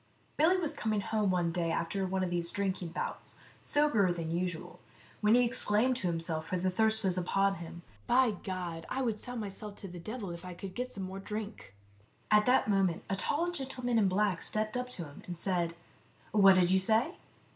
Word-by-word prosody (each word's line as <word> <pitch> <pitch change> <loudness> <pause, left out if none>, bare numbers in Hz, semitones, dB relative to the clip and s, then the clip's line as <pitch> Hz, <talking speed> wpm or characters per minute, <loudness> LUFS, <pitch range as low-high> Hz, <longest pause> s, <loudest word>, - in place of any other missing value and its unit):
Billy 330 +5 +4
was 335 -5 -1
coming 215 -1 -1
home 210 0 0
one 175 -2 +1
day 170 0 -1
after 190 +4 -1
one 190 0 0
of 180 - -2
these 170 -1 0
drinking 190 -3 -1
bouts, 165 - -5 0.2
soberer 290 -11 +3
than 165 -2 -3
usual, 175 -1 -3 0.4
when 210 +2 +4
he 245 0 +5
exclaimed 240 +1 +1
to 190 - -2
himself, 165 -2 -2
for 185 - -1
the 185 +1 0
thirst 220 +3 +2
was 185 -1 +2
upon 195 +2 +1
him, 170 0 -9
" 100 - -29
By 260 -3 +5
God! 180 -4 -5
I 265 +1 -1
would 225 -4 -1
sell 245 - -5
myself 210 -1 -5
to 200 - -7
the 175 -1 -8
devil 215 +1 -5
if 170 +1 -8
I 180 -1 -7
could 190 +1 -7
get 250 +4 -4
some 195 - -5
more 190 +1 -5
drink." 210 - -6 0.6
At 210 +1 +5
that 250 -2 +4
moment 195 -5 +2
a - - +2
tall 325 - 0
gentleman 260 -6 -1
in 205 - +4
black 190 -1 +1
stepped 215 +1 -1
up 250 0 -2
to 190 -8 -5
him, 145 -1 -12
and 175 -1 -5
said, 170 -2 0 0.3
" - - -27
What 195 -2 +7
did 180 -1 +4
you 190 - +5
say 225 - +2
195 Hz, 210 wpm, -32 LUFS, 175-220 Hz, 0.6 s, What